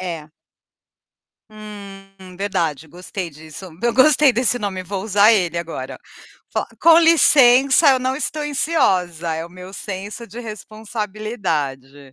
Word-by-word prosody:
Eh, 180 -2 -4
é. 150 - -21 1.2
Hum, 195 -3 -12
verdade, 165 -6 -3
gostei 180 +2 -7
disso. 155 +4 -11 0.2
Eu 235 -1 +1
gostei 285 +1 +5
desse 245 +1 +1
nome, 195 -4 -4
vou 190 +1 -5
usar 210 +1 +4
ele 180 -5 0
agora. 170 -1 -6 0.6
Fal - - -2
com 330 0 +7
licença, 275 -4 +5
eu 265 - +3
não 260 +1 -1
estou 300 +1 -3
ansiosa, 185 - 0
é 160 +1 -4
o - - -16
meu 185 +1 -12
senso 205 +4 -7
de 230 +5 -9
responsabilidade. 205 - -5
200 Hz, 135 wpm, -20 LUFS, 175-240 Hz, 1.2 s, com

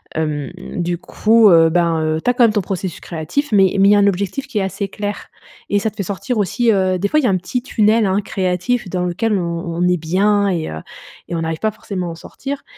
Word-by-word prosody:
Hem, 150 -3 -2 0.3
du 175 0 -1
coup, 220 +4 +3
heu, 165 -2 +6
ben, 170 -1 +1
heu, 155 0 -1
tu - - +1
as - - +3
quand 245 -1 +5
même 220 - +2
ton 205 - +1
processus 185 -2 -5
créatif, 175 - -3
mais 195 -3 +4
mais 195 +1 +6
il - - +6
y - - +6
a 205 - +4
un 200 - +4
objectif 200 +8 -2
qui 230 -6 -2
est - - 0
assez 195 +1 -3
clair 205 +1 -5 0.4
et 205 - +2
ça 220 - -1
te - - -26
fait 200 - -2
sortir 205 +6 -3
aussi, 225 +4 +1
heu 185 -2 +1
des 200 - 0
fois 305 - +3
il 300 - -1
y - - +3
a - - +3
un 185 - +2
petit 240 +7 -3
tunnel, 220 -2 +2
hein, 195 +1 +1
créatif 190 +3 -1
dans 180 0 -2
lequel 210 +6 -1
on 170 -1 -3
on 175 +1 +1
est 180 0 +2
bien 200 +5 +1
et 170 -4 -2
heu 80 - -6 0.5
et 170 - -4
on 165 - -2
n'arrive 160 0 -3
pas 220 - 0
forcément 190 -3 -5
à 170 - -4
en - - -7
sortir. 275 +11 -7
195 Hz, 270 wpm, -18 LUFS, 175-215 Hz, 0.5 s, heu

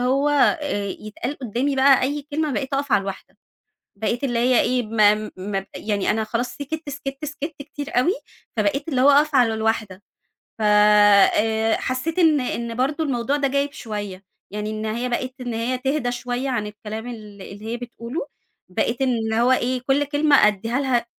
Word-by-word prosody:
هو 270 +4 +2
آآ 290 -6 +2 0.2
يتقال 235 +6 -5
قُدّامي 260 +3 -1
بقى 270 0 +5
أي 285 +3 -1
كلمة، 305 0 0
بقيت 270 +1 -2
أقف 275 -1 -1
على 205 - +5
الواحدة، 195 0 -8 0.6
بقيت 235 +5 -2
اللي 240 -3 0
هي 245 +1 +4
إيه 250 0 +1
م 215 -1 +3
م 195 +1 -3
يعني 205 -2 -1
أنا 220 +1 0
خلاص 235 +3 -2
سكِتّ، 305 +2 -6
سكِتّ، 275 +1 -6
سكِتّ 300 +1 -5
كتير 290 -3 -4
أوي، 340 +9 +3 0.4
فبقيت 295 0 0
اللي 265 -5 0
هو 275 +2 +7
أقف 295 +1 +4
على 240 -4 +4
الواحدة. 220 -3 -2 0.6
ف - - -5
آآ 210 +1 +5
حسيت 260 +7 -2
إن 315 -4 +5
إن 235 -2 -3
برضو 285 +6 0
الموضوع 270 -1 0
ده 280 -1 +1
جايب 280 +1 0
شوية، 205 -6 -6 0.3
يعني 210 +1 -4
إن 215 0 -4
هي 235 +3 -2
بقِت 255 +2 -2
إن 245 -2 -4
هي 235 +3 -1
تهدا 265 0 -1
شوية 245 +2 -3
عن 230 -5 -1
الكلام 210 +2 -7
ال 245 - -5 0.3
اللي 200 +3 -10
هي 230 +2 -3
بتقوله، 240 +4 -6 0.4
بقيت 230 +7 -1
إن 230 -4 0
هو 240 +3 +3
إيه، 255 0 +1
كل 275 +2 +3
كلمة 290 -4 +4
أدّيها 225 +5 -1
لها 255 -4 +1
245 Hz, 180 wpm, -22 LUFS, 220-280 Hz, 0.6 s, هو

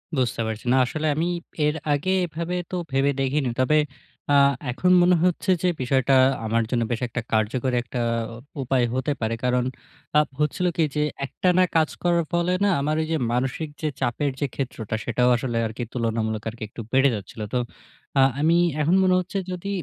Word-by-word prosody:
বুঝতে 125 -3 0
পারছি। 110 +1 -5
না, - - +4
আসলে 155 +4 -2
আমি 165 +3 0 0.4
এর 150 +1 +1 0.2
আগে 150 +7 0
এভাবে 170 +1 -4 0.2
তো - - -2 0.2
ভেবে 135 +1 +2
দেখিনি। 135 -1 0
তবে 150 +4 +3 0.6
আ - - +6 0.4
এখন 180 +9 +1
মনে 180 +1 +5
হচ্ছে 180 +2 +1
যে - - +3
বিষয়টা 130 +1 +2 0.3
আমার 115 +1 +1
জন্য 120 -2 +1
বেশ 120 - -2
একটা 120 0 -4
কার্যকর 115 +4 +1
একটা 125 +1 -5 0.6
উপায় 125 -1 +2
হতে 130 +3 -1
পারে। 110 +1 0
কারণ 125 0 +2 0.5
আ - - +8 0.2
হচ্ছিল 150 +5 0
কি 165 - +4
যে, 150 - +1 0.2
একটানা 180 +6 +2
কাজ 160 -1 +4
করার 170 -1 +2
ফলে 175 +1 +1
না 205 - +4
আমার 150 +2 0
ওইযে 160 0 -1 0.2
মানসিক 135 +5 -1
যে 155 - 0
চাপের 135 +3 0
যে 145 - +1
ক্ষেত্রটা 115 -5 -3
সেটাও 125 +1 +2
আসলে 120 -1 -2
আরকি 110 +2 -5
তুলনামূলক 110 -2 -1
আরকি 110 0 -7 0.3
বেড়ে 135 +1 +5
যাচ্ছিল। 105 +2 -8
তো 125 - +2 0.6
আ - - +7 0.2
আমি 165 +3 +4 0.2
এখন 165 +5 +3
মনে 185 -1 +4
হচ্ছে 185 +2 -4
যদি 180 +2 -5
135 Hz, 175 wpm, -24 LUFS, 120-160 Hz, 0.6 s, আ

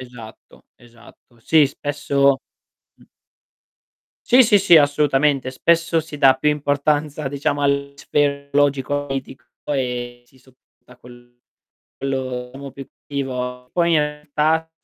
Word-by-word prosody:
Esatto, 120 -3 -13
esatto. 120 0 -20
Sì, 155 +3 +4
spesso 140 -1 0 0.6
Mh. - - -22 1.3
Sì, 255 +2 +8
sì, 210 -3 +4
sì 185 -3 +5
assolutamente. 145 -2 +2
Spesso 165 +4 +1
si 155 -2 -10
dà 135 -2 +6
più 150 +3 +1
importanza 145 0 -1
diciamo 145 +1 -2
all'aspetto 140 0 -1
logico 145 0 +1
e - - -12
politico 135 -1 -6 0.3
e 125 -2 -4
si 130 - -26
sopporta 125 -1 -24
quello 120 0 -15 1.3
diciamo 140 0 -9
più 135 -1 -10 0.2
creativo. 125 -2 -5
Poi 170 -1 +1
in 155 - +4
realtà 150 +2 -1
140 Hz, 115 wpm, -20 LUFS, 130-150 Hz, 1.3 s, Sì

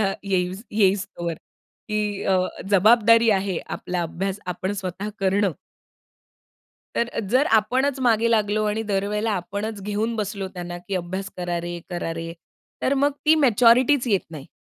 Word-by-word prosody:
10वीला 195 -2 +2
येई 180 -2 0 0.2
येईसतोवर. 190 -4 0 0.5
की 210 -1 -1
अ, 190 - +3 0.3
जबाबदारी 230 +3 +5
आहे 195 -3 0
आपला 180 -1 -3
अभ्यास 190 +4 -3
आपण 185 +3 -3
स्वतः 195 0 -4
करणं. 195 -1 +2 1.4
तर 235 - +1 0.2
जर 265 +4 +4
आपणच 260 +5 0
मागे 230 -2 +3
लागलो 215 -1 +2
आणि 210 +1 -1
दरवेळेला 205 +3 0
आपणच 200 +3 -4
घेऊन 210 +3 -1
बसलो 200 -2 -3
त्यांना 175 -1 -6
की 180 +3 -6
"अभ्यास 185 +2 -4
करा 175 -1 -2
रे, 175 0 -5
करा 175 -2 -3
रे." 165 0 -5 0.5
तर 270 - +2
मग 290 - +4
ती 310 +1 +6
मॅच्युरिटीच 245 +2 +5
येत 200 -4 +3
नाही. 150 -4 -9
200 Hz, 145 wpm, -23 LUFS, 185-225 Hz, 1.4 s, ती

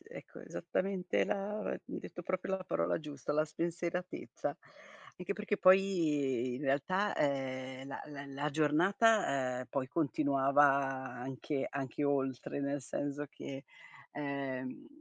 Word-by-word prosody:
ecco, 485 - -10
esattamente 185 -1 0
la 205 +1 -1
ehm, - - -3
hai - - -4
detto 175 - -8
proprio 185 +2 -1
la 185 - -7
parola 85 - +1
giusta: 150 -2 -4
la 155 +1 +3
spensieratezza. 170 -1 -3 0.6
Anche 180 +2 -2
perché 210 0 -1
poi 150 -10 +4
in 130 - -5
realtà, 165 +9 +1
ehm, 130 -1 -1
la - - -5
la 140 -1 -7
la 140 +2 -2
giornata, 150 - +3
ehm, 130 - -6
poi 135 -2 -1
continuava 140 -2 +3
anche 135 0 -1
anche 140 +1 -2
oltre, 135 -1 0
nel 140 0 -1
senso 145 +3 -3
che, 135 0 -7 0.5
ehm, 140 - -3
145 Hz, 130 wpm, -34 LUFS, 135-180 Hz, 0.6 s, poi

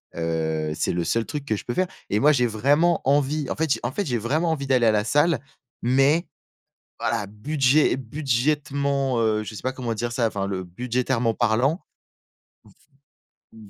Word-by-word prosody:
heu, 80 -2 -1
c'est - - -1
le 85 -1 -1
seul 115 +7 0
truc 145 -2 -5
que 110 - 0
je - - -7
peux 120 - -3
faire. 185 +5 +1 0.2
Et 105 - +2
moi, 150 +2 +5
j'ai 125 -2 +2
vraiment 145 +10 +2
envie, 145 +1 +1
en - - -2
fait 160 -2 -1
j'ai - - -4
en - - -1
fait, 205 - -2
j'ai 120 -4 -1
vraiment 155 +9 0
envie 140 -3 -3
d'aller 125 -3 +3
à - - +5
la 105 -1 +1
salle 145 +1 +2 0.4
mais 135 +7 +3 0.7
voilà, 110 -3 -1
budget 135 +6 +2
budgétairement, 140 0 -1
heu, 110 -1 +1
je 110 - -8
sais - - -8
pas 130 - -1
comment 120 -3 -3
dire 120 +2 -3
ça, 120 -1 +1
enfin 100 -2 -3
le 95 -2 -3
budgétairement 120 +4 -1
parlant 125 - +1 1.7
v 110 -2 -14
125 Hz, 185 wpm, -24 LUFS, 110-145 Hz, 1.7 s, moi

